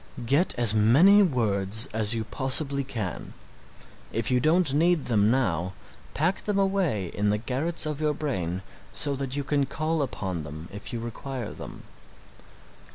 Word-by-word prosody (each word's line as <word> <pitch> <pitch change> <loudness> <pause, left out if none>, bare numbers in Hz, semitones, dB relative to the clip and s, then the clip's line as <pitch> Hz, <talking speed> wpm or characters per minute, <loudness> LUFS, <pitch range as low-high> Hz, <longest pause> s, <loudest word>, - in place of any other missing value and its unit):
Get 140 +9 +2
as 120 -3 +3
many 140 - +6
words 110 - +2
as 110 +1 +1
you 110 - -2
possibly 140 +3 0
can 110 -9 -5 0.8
if 115 +2 -2
you 125 - +3
don't 155 +2 +2
need 165 +1 +2
them 105 -3 +2
now, 95 -8 0 0.4
pack 180 +6 0
them 210 -1 0
away 190 - 0
in 105 0 0
the 105 - +2
garrets 140 +10 -1
of 155 -1 -4
your 150 -1 +1
brain 95 - -3 0.3
so 145 -1 +1
that 135 -1 -3
you 145 - -2
can 140 0 0
call 155 +2 -1
upon 95 - -3
them 75 +3 -9
if 105 +3 -7
you 120 - -3
require 120 +1 -6
them. - - -10
130 Hz, 160 wpm, -26 LUFS, 105-150 Hz, 0.8 s, many